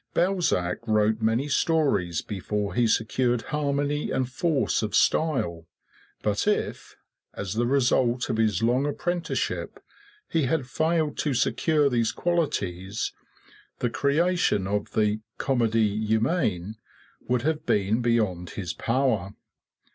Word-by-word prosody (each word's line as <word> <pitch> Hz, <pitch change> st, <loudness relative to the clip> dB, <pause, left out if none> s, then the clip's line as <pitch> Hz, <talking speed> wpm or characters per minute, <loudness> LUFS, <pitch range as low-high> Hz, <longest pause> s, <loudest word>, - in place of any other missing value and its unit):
Balzac 175 Hz, -, +1 dB
wrote 110 Hz, +1 st, +2 dB
many 115 Hz, +5 st, +1 dB
stories 140 Hz, -, +1 dB
before 105 Hz, 0 st, -3 dB
he 120 Hz, -1 st, +2 dB
secured 120 Hz, +2 st, +1 dB
harmony 145 Hz, 0 st, 0 dB
and 130 Hz, -1 st, 0 dB
force 145 Hz, +3 st, 0 dB
of 105 Hz, -1 st, -2 dB
style; 90 Hz, -, +1 dB, 0.6 s
but 105 Hz, -, 0 dB
if, 210 Hz, -, -1 dB, 0.4 s
as 95 Hz, -2 st, -4 dB
the 120 Hz, +2 st, 0 dB
result 125 Hz, -2 st, +2 dB
of 110 Hz, -, -1 dB
his 110 Hz, -3 st, +1 dB
long 125 Hz, +5 st, +2 dB
apprenticeship, 175 Hz, +3 st, -2 dB, 0.5 s
he 160 Hz, -4 st, +1 dB
had 135 Hz, +1 st, 0 dB
failed 155 Hz, +3 st, 0 dB
to 145 Hz, -4 st, 0 dB
secure 150 Hz, +3 st, +2 dB
these 115 Hz, -4 st, +1 dB
qualities, 105 Hz, -, -2 dB, 0.6 s
the 120 Hz, -, -1 dB
creation 150 Hz, -, +1 dB
of 100 Hz, +1 st, -2 dB
the 105 Hz, 0 st, +1 dB, 0.2 s
"Comedie 110 Hz, -4 st, +1 dB
Humaine" 110 Hz, -, 0 dB, 0.5 s
would 125 Hz, -1 st, +1 dB
have 155 Hz, +1 st, -1 dB
been 105 Hz, +4 st, +2 dB
beyond 105 Hz, -8 st, 0 dB
his 90 Hz, -5 st, -3 dB
power. 115 Hz, -6 st, 0 dB
120 Hz, 120 wpm, -26 LUFS, 105-145 Hz, 0.6 s, wrote